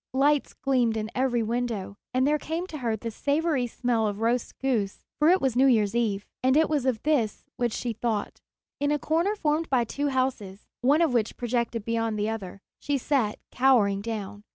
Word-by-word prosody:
Lights 285 +1 +2
gleamed 245 -5 +1
in 215 0 -3
every 250 -3 +1
window, 230 -4 -2 0.2
and 255 +1 +2
there 300 +1 +2
came 325 +4 -3
to 315 -5 -7
her 230 -3 0
the 230 +2 -5
savory 285 0 0
smell 235 -2 0
of 205 0 -3
roast 235 +2 0
goose, 230 -7 -1
for 300 +2 +5
it 370 +2 +5
was 265 -3 0
New 265 +2 +5
Year's 215 -5 +3
Eve. 215 -4 0 0.2
And 260 +2 +3
it 320 - +4
was 285 -4 +1
of 240 -4 0
this 270 -9 +1
which 240 -1 0
she 240 -2 -2
thought. 220 -2 -3 0.4
In 285 - +1
a 295 - +2
corner 335 +8 0
formed 315 -3 0
by 255 -3 +3
two 285 +5 -2
houses, 255 -8 -2 0.2
one 285 +7 +4
of 315 - +1
which 230 -2 0
projected 235 -2 -1
beyond 225 -1 -1
the 210 +1 0
other, 200 -3 -6 0.2
she 285 -1 -1
sat 255 -5 0
cowering 230 -7 +3
down. 205 -2 -5
245 Hz, 200 wpm, -26 LUFS, 220-280 Hz, 0.4 s, for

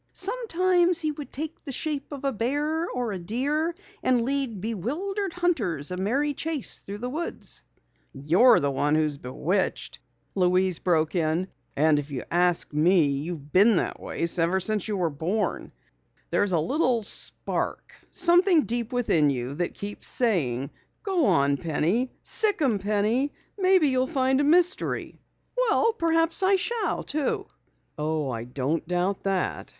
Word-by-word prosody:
Sometimes 370 -5 +1
he 310 -2 0
would 295 -1 -9
take 310 +3 -5
the 280 - -6
shape 295 +2 -3
of 280 -1 -6
a 275 - +2
bear 295 +9 -1
or 245 -3 -3
a 190 - -4
deer 285 - -1 0.3
and 245 -2 +2
lead 270 -6 0
bewildered 300 - -3
hunters 225 - -1
a - - -2
merry 270 +10 0
chase 315 -2 -3
through 200 +1 -8
the 245 +4 -4
woods." 330 +4 -5 0.5
"You're 175 - +4
the 140 0 0
one 145 +2 +1
who 155 - +3
is 150 -2 -1
bewitched," 170 +10 -2 0.3
Louise 185 -1 +2
broke 160 -3 +1
in. 170 +1 0 0.3
"And 150 0 +3
if 145 0 -6
you 135 -3 -5
ask 175 -2 +2
me, 165 +2 +4
you've 145 +1 -5
been 205 +4 +6
that - - -1
way - - -3
ever 170 +3 +2
since 210 +1 -1
you 210 -2 -2
were 170 -3 0
born. 175 +9 -2 0.6
There's 205 -1 +1
a 170 - +3
little 245 - +1
spark - - -1 0.2
something 350 -2 +4
deep 235 0 -2
within 200 - +2
you 130 -1 -3
that 175 +4 -3
keeps 205 +1 -5
saying: 140 - 0 0.3
'Go 370 - +1
on, 140 -6 +3
Penny. 170 - 0
Sic 430 -4 +2
'em, 250 -9 +1
Penny! 215 +7 0 0.2
Maybe 370 -6 +4
you'll 260 0 +1
find 265 -2 +1
a - - +1
mystery!'" 355 +5 +2 0.8
"Perhaps 330 +1 +2
I 385 +1 +4
shall 425 0 -1
too!" 295 -1 -2 0.5
"Oh, 150 -2 -1
I 115 -1 -5
don't 135 +6 -2
doubt 180 +3 -1
that. 195 -2 -1
220 Hz, 155 wpm, -26 LUFS, -, 0.8 s, been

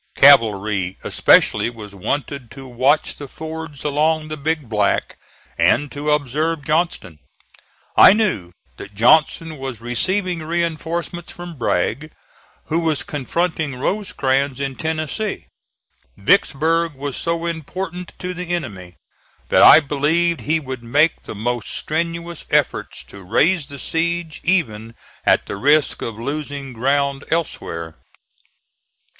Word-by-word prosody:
Cavalry 100 -4 +4
especially - - +4
was 110 -4 -10
wanted 140 +5 -4
to 135 +2 -11
watch 130 +5 +1
the 145 - -8
fords 160 0 -8
along 155 +2 +1
the 155 - -4
Big 155 -1 -2
Black, 105 -2 0 0.4
and 145 -1 +3
to 145 +1 -4
observe 150 +2 0
Johnston. 155 - -1 0.8
I - - +9
knew 185 - 0 0.3
that 100 - -10
Johnston 155 +6 +3
was 135 -4 -5
receiving 180 - -1
reinforcements 170 +1 -3
from 175 0 -9
Bragg, 125 - -1 0.5
who 160 - 0
was 160 -3 0
confronting 155 0 -2
Rosecrans 135 -5 -1
in 135 -1 -2
Tennessee. 160 +8 -3 0.7
Vicksburg 165 +2 +2
was 140 0 -5
so 170 0 -2
important 170 +2 -5
to 180 0 -4
the 180 -1 -3
enemy 95 - -7 0.5
that - - +4
I - - +10
believed 160 +3 +1
he 160 +2 +1
would 130 -4 -6
make 145 +7 +2
the - - -8
most 120 0 -3
strenuous 170 +1 -3
efforts - - 0
to 100 - -13
raise 150 - +2
the 140 - -9
siege, 165 +1 -2
even 115 - 0 0.3
at - - +4
the - - -5
risk 145 +6 +2
of 115 -2 -5
losing 140 +1 -5
ground 140 +3 0
elsewhere. 85 - -3
150 Hz, 125 wpm, -20 LUFS, 125-165 Hz, 0.8 s, I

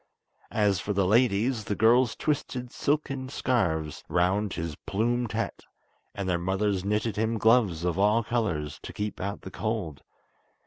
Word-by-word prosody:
As 105 -4 +2
for 105 +4 -2
the 100 -1 +2
ladies, 110 +2 +2
the 105 - -1
girls 120 +3 +4
twisted 130 -4 -2
silken 135 -3 -1
scarves 85 - -1
round 95 +4 +1
his 85 -2 -4
plumed 120 +3 0
hat, - - -3 0.5
and 100 -2 -3
their 90 -2 +1
mothers 95 +1 0
knitted 105 +1 -1
him 110 +1 0
gloves 105 -7 +3
of 90 +1 0
all 105 +3 +4
colours, 95 -11 -2
to - - -8
keep 105 0 -4
out 100 +2 -3
the 95 - -9
cold. 100 -11 -3
105 Hz, 150 wpm, -27 LUFS, 95-115 Hz, 0.5 s, girls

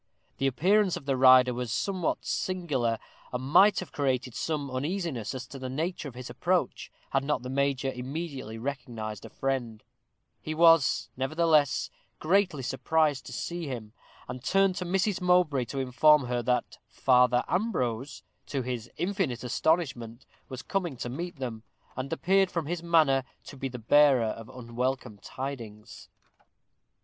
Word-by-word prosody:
The 135 - +2
appearance 190 +8 +2
of - - -11
the 135 -1 +1
rider 130 -1 +7
was 120 -2 -4
somewhat 180 - -1
singular, 145 -11 -1 0.3
and 125 0 -3
might 195 +10 +5
have 185 - -9
created 130 -3 -1
some 145 -2 -3
uneasiness 140 - -3
as 130 0 -5
to 135 - -8
the 130 0 -5
nature 160 +4 -3
of 130 - -10
his 125 0 -7
approach, - - -1 0.2
had 135 - +1
not 140 -4 -1
the 125 - -5
major 135 -1 0
immediately 130 -3 -6
recognized 115 -5 -5
a - - -9
friend; 125 -5 -3 0.6
he 155 - -4
was, 165 -3 +5
nevertheless, 155 +2 +2 0.3
greatly 180 -4 +1
surprised 145 +3 0
to - - -8
see 170 -2 -4
him, 115 -5 -6 0.3
and 125 0 -7
turned 195 +6 +3
to 180 - -3
Mrs. 190 +2 0
Mowbray 180 -8 +3
to 135 - -7
inform 135 +2 +4
her 125 0 -1
that 125 +1 -1
Father 125 -1 +3
Ambrose, 140 - -2 0.2
to 135 -3 -2
his 120 -2 -4
infinite 180 - -1
astonishment, 125 -4 -1 0.2
was 130 -2 -7
coming 175 -8 -2
to 120 - -4
meet 170 +8 -5
them, 120 -5 -5 0.3
and 130 +1 -5
appeared, 190 +3 +2
from 170 -4 -3
his 170 +2 -3
manner, 155 -6 +3 0.2
to - - -11
be 135 0 -4
the 125 - -7
bearer 135 +2 +5
of 115 +2 -7
unwelcome 125 -2 -4
tidings. 115 -6 -8
135 Hz, 155 wpm, -28 LUFS, 125-165 Hz, 0.6 s, rider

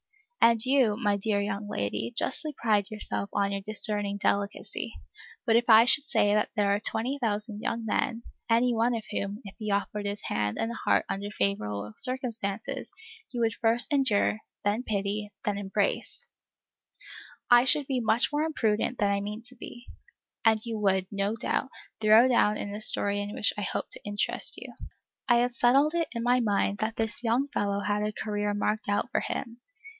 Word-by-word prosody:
And 230 0 +5
you, 255 -6 +3
my 205 -4 +1
dear 205 0 0
young 205 0 -3
lady, 105 - -2
justly 310 - 0
pride 210 -4 +1
yourself 210 -1 -3
on 200 0 0
your 200 0 -3
discerning 205 -1 -1
delicacy; 200 0 -2 0.5
but 225 -2 +3
if 235 +1 +2
I 225 +1 +8
should 280 +3 +5
say 205 -7 +2
that 210 - +1
there 205 -1 +2
are 200 - 0
twenty 240 +6 -1
thousand 215 -2 -2
young 230 0 -3
men, 230 +2 -1 0.3
any 240 +2 +3
one 235 +1 +1
of 225 - -4
whom, 205 +2 -3
if 195 - -9
he 215 -1 -4
offered 205 +1 -1
his 205 +1 -4
hand 105 0 -1
and 225 +1 -2
heart - - +1
under 200 +1 -4
favorable 105 - -2
circumstances, 235 -6 -1 0.4
you 245 - -3
would 225 -1 +2
"First 235 +5 +1
endure, 225 -6 +2 0.2
then 205 +3 +1
pity, 205 -2 -2 0.2
then 205 -1 -1
embrace," 200 0 -2 1.3
I 240 0 +8
should 280 +3 +4
be 265 -2 -1
much 230 +3 +2
more 295 - +1
imprudent 245 -7 0
than 205 -2 +1
I 200 0 0
mean 210 +3 -6
to 245 +1 -11
be, 240 0 -10 0.6
and 220 -1 +4
you 225 -2 -4
would, 190 -2 +2
no 200 +1 -1
doubt, 255 +3 -1 0.3
throw 220 +3 +6
down 215 -4 +3
a 205 +1 -5
story 205 -1 +1
in 205 0 -5
which - - +3
I 210 - -4
hope 195 - -3
to - - -5
interest 205 0 +1
you. - - -9 0.6
I 240 - +6
had 245 +1 +1
settled 270 +6 +3
it 335 -1 0
in 235 -1 -3
my 245 +1 +3
mind 205 -2 0
that 220 +1 -2
this 225 0 -3
young 245 +5 +1
fellow 200 -6 -1
had 205 0 -1
a 210 0 -1
career 210 -1 -2
marked 210 +1 -1
out 205 +5 0
for - - +1
him. 235 0 -5
215 Hz, 185 wpm, -28 LUFS, 205-235 Hz, 1.3 s, I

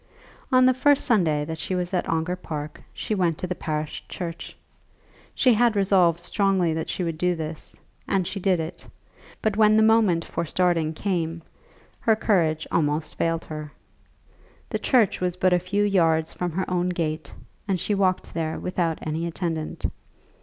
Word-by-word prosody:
On 255 0 +6
the 255 - +5
first 285 +2 +3
Sunday 165 - +2
that 160 +1 -5
she 185 - -2
was 180 +1 -2
at 180 - 0
Ongar 165 +2 0
Park 150 -4 -6
she - - -4
went 175 -5 +1
to - - -3
the 180 - -2
parish 155 -3 -4
church. 170 -2 -6 0.8
She 255 -2 +4
had 230 0 +3
resolved 185 -4 +3
strongly 190 -2 +1
that 160 0 -3
she 185 - -2
would 165 -2 -3
do 180 0 +2
this, 160 -1 -6 0.3
and 190 -2 +1
she 195 - -4
did 185 -2 +2
it; 165 +2 -6 0.6
but 215 -2 +1
when 215 0 +5
the 220 - +5
moment 220 -7 +4
for - - -3
starting 170 -1 +1
came, 165 -2 -2 0.6
her 225 -2 +3
courage 170 -8 +1
almost 150 0 0
failed 165 0 -1
her. 155 -1 -7 1.0
The - - -1
church 235 -9 +2
was 180 -1 0
but 185 0 +2
a 180 - +4
few 200 +4 0
yards 165 -5 +2
from 180 -1 -3
her 190 +2 -2
own 180 0 0
gate, 160 -3 -3 0.3
and 190 -3 0
she 210 - -1
walked 190 -2 0
there 160 -1 -2
without 175 -3 -1
any 160 +2 -2
attendant. 165 -2 -3
175 Hz, 175 wpm, -24 LUFS, 160-195 Hz, 1.0 s, On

